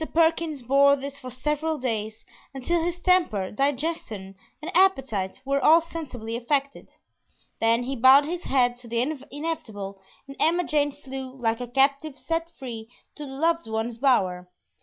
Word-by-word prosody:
Perkins 325 -4 +2
bore 280 +3 +5
this 280 0 -7
for 255 - -8
several 300 +5 -2
days 220 -4 -3 0.3
until 330 +6 0
his 350 +1 -2
temper, 345 - +2
digestion, 265 - -2 0.3
and 320 +5 -7
appetite 265 - +2
were 275 +1 0
all 320 +2 +7
sensibly 265 -9 -6
affected; 275 +3 -2 0.7
then 230 +2 +2
he 270 +2 -3
bowed 260 +4 +7
his 345 +3 -4
head 245 -2 +2
to 245 -1 -11
the 230 0 -1 0.3
inevitable, 215 -11 -5 0.3
and 275 - -9
Emma 345 +2 +3
Jane 295 -3 +1
flew, 265 -2 -8
like 230 -2 -1
a 245 - -4
captive 275 +3 +1
set 330 +2 -2
free, 230 -4 -7 0.2
to 295 -2 -8
the 265 - -8
loved 330 +1 0
one's 225 +1 -3
bower. 185 -9 +1
270 Hz, 155 wpm, -25 LUFS, 235-315 Hz, 0.7 s, all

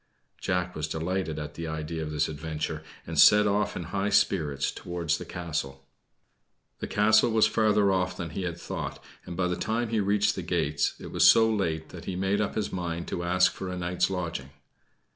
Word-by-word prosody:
Jack 90 0 -1
was 75 0 -2
delighted 80 0 -2
at 75 -1 -5
the 85 0 -5
idea 80 +1 -4
of 80 - -4
this 75 0 0
adventure, 80 0 -4 0.2
and - - -3
set 105 0 +8
off 105 +1 +1
in 90 - -4
high 95 +4 -2
spirits 75 -9 +1
towards 85 -3 -2
the - - -7
castle. 70 -6 -4 0.9
The - - -4
castle 110 +2 +4
was 110 -1 +4
farther 105 -2 +3
off 90 -1 0
than 85 -3 -5
he 95 - -4
had 90 -2 -3
thought, - - -5 0.3
and 85 -1 -6
by 90 -1 +1
the 90 - -1
time 115 +4 -1
he 110 -1 +1
reached 105 +1 +2
the - - -4
gates, 70 0 0
it - - -8
was - - +5
so 115 -1 +6
late 85 -8 -1
that 85 -1 -10
he 95 - -3
made 95 +3 0
up 105 - -2
his 105 -2 -2
mind 85 -2 -3
to 85 - -3
ask 90 +1 +3
for 95 - -6
a 90 - -4
night's 90 0 0
lodging. 85 -8 -4
90 Hz, 200 wpm, -27 LUFS, 80-100 Hz, 0.9 s, set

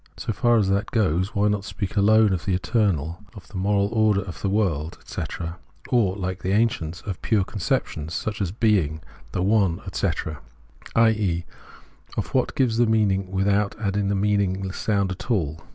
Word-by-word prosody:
So 110 - -3
far 120 +2 +3
as 105 -3 +2
that 100 +1 0
goes, 95 -2 +1
why 105 +1 +3
not 105 -2 0
speak 100 -1 -5
alone 105 0 +5
of 90 - -3
the 95 - +1
eternal, 90 - 0 0.2
of 100 - -12
the - - -13
moral 100 +1 +2
order 110 -3 +3
of 90 - -8
the 100 - 0
world, 85 -7 0
etc., 85 -1 -5 0.3
or, 110 -7 +2
Hke 95 -1 -3
the 95 - -1
ancients, 90 -7 0
of 95 -4 -6
pure 110 -4 +2
conceptions 80 -5 -2
such 110 -1 -3
as 90 -4 -1
being, 95 -8 +1 0.3
the 90 - -1
one, 100 -4 +2
etc., 75 -3 -2 0.5
i.e. 105 -7 +2 0.7
of - - -3
what - - +1
gives 120 -4 +2
the 120 - +4
meaning 100 -4 +2
without 100 +1 +1
adding 100 -1 0
the 100 - +1
mean 100 +1 +2
ingless 95 0 -2
sound 100 -3 0
at 95 +5 -7
all 80 -9 0
100 Hz, 180 wpm, -24 LUFS, 90-105 Hz, 0.7 s, alone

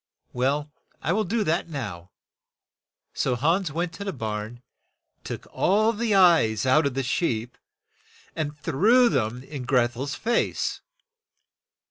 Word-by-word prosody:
Well, 145 +4 0 0.3
I 170 - 0
will 215 +2 +1
do 220 +4 0
that 170 -1 -1
now." 100 - -6 1.0
So 125 - 0
Hans 165 +8 +1
went 170 +2 -2
to 200 - -7
the 200 - -3
barn, 110 - -5 0.6
took - - -6
all 215 +4 +2
the 225 -1 0
eyes 160 - +4
out 140 +3 +4
of 135 - -4
the 135 - -1
sheep, 120 -4 -1 0.8
and 150 -2 -3
threw 215 - +4
them 120 - -1
in 140 -1 -7
Greth 120 -1 +2
el's 135 +2 -4
face. 235 - -1
145 Hz, 135 wpm, -25 LUFS, 125-185 Hz, 1.0 s, eyes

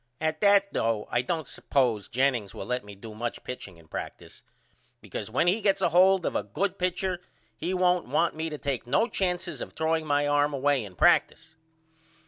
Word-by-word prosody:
At 155 0 -1
that 200 -1 +4
though 115 -2 0
I 120 - +2
don't 160 +2 -3
suppose 120 -7 0
Jennings 125 -6 0
will - - -6
let 125 +3 -2
me 105 0 -11
do 110 +2 -10
much 120 +2 -5
pitching 100 -8 -8
in 85 -1 -19
practice - - -8 0.6
because 105 - -6
when 125 +8 +1
he 190 +6 +2
gets 195 -1 +2
a 190 - +2
hold 185 +1 +5
of - - -1
a - - +2
good 195 0 -3
pitcher 180 0 -1 0.3
he 185 - -2
won't 180 -3 +2
want 155 +6 +1
me 160 +1 -3
to 150 - -5
take 135 -4 -3
no 180 - +2
chances 180 -5 -2
of - - -6
throwing 160 0 0
my 145 0 +2
arm 145 0 +2
away 140 -2 +1
in 95 -3 -10
practice. 160 - +2
150 Hz, 195 wpm, -27 LUFS, 120-180 Hz, 0.6 s, hold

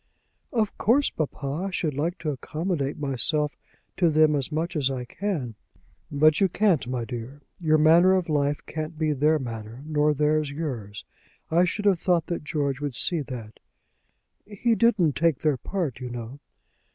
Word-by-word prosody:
"Of 220 -4 0
course, 275 +6 +3
papa, 150 +2 -3
I - - -3
should 165 -5 -2
like 160 +6 -2
to 155 - -1
accommodate 150 +1 -3
myself 150 +2 0 0.4
to 175 -3 +4
them 155 -1 +4
as 140 +1 -2
much 165 +3 -2
as 140 -3 +1
I 130 -2 -4
can." 155 - -3 0.6
"But 150 +2 +4
you 195 - +4
can't, 180 - +2
my 125 -2 -2
dear. 125 +4 -7 0.2
Your 155 -3 +3
manner 165 +4 +6
of 185 -2 0
life 145 -2 0
can't 155 +1 -5
be 155 -1 +1
their 150 +3 +3
manner, 115 -1 -7
nor 150 -1 +2
theirs 150 0 +1
yours. 125 -9 -5 0.5
I 175 +3 +4
should 205 +4 -3
have 195 -4 +4
thought 175 -2 +1 0.2
George 145 -3 -2
would 145 -4 -3
see 165 +6 +3
that." 120 -6 -8 0.8
"He 215 +3 0
didn't 215 - +3
take 160 -3 +2
their 150 -4 +2
part, 160 - -3
you 125 -1 -5
know." 120 +3 -7
150 Hz, 165 wpm, -25 LUFS, 135-170 Hz, 0.8 s, manner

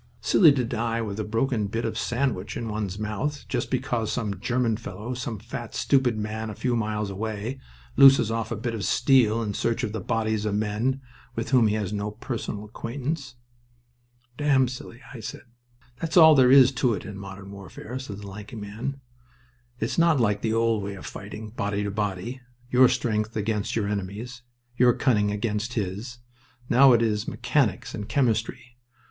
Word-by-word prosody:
"Silly 165 -6 +6
to 130 -3 0
die 115 0 -1
with 105 -1 -5
a - - 0
broken 115 0 0
bit 115 +4 -3
of - - -2
sandwich 120 -6 -1
in 115 -2 -4
one's 105 -3 -3
mouth, 110 +8 -3
just 120 -2 -2
because 120 -3 -1
some 105 -6 -2
German 120 0 +1
fellow, 110 +2 -6
some 120 -2 -4
fat, 115 +2 -7
stupid 130 -5 +2
man 110 +1 -3
a 105 - -6
few 125 +3 0
miles 105 -2 -1
away, 110 +5 -4 0.4
looses 135 -5 +7
off 115 0 -2
a - - 0
bit 115 +2 -3
of 110 -3 -4
steel 120 -3 +3
in 105 -2 -3
search 115 +4 -1
of 110 - -1
the 110 - -3
bodies 110 +1 -1
of 105 -1 -1
men 110 +6 0 0.3
with 115 +3 -3
whom 125 -4 +5
he 105 - +1
has 105 -2 -2
no 105 0 -2
personal 105 -1 -5
acquaintance." 130 +5 -5 1.0
"Damn 135 -3 +4
silly," 125 0 -8
I 125 - -8
said. - - -7 0.6
"That's 165 +1 -1
all 160 -2 +9
there 130 -3 +6
is 135 -1 +8
to 125 -4 +1
it 90 - -7
in 105 - -7
modern 100 0 -9
warfare," 100 +5 -8
said 110 -7 -7
the 100 - -8
lanky 105 +3 -9
man. 110 +6 -5 0.8
"It's 115 +8 -1
not 165 -4 +4
like 105 -3 +1
the 110 - 0
old 115 -1 +2
way 100 0 -5
of 95 - -10
fighting, 105 +2 -8
body 105 -3 -2
to 100 - -2
body. 105 +4 -3 0.3
Your 125 0 +6
strength 110 -1 -1
against 105 -1 -1
your 110 -3 0
enemy's, 105 +5 -4 0.3
your 125 0 +5
cunning 105 -6 +2
against 105 +2 -2
his. 105 +4 -4 0.5
Now 130 +2 +7
it 115 -1 +4
is 105 -2 0
mechanics - - 0
and 105 +1 -6
chemistry. 120 -1 -1
110 Hz, 180 wpm, -26 LUFS, 105-125 Hz, 1.0 s, all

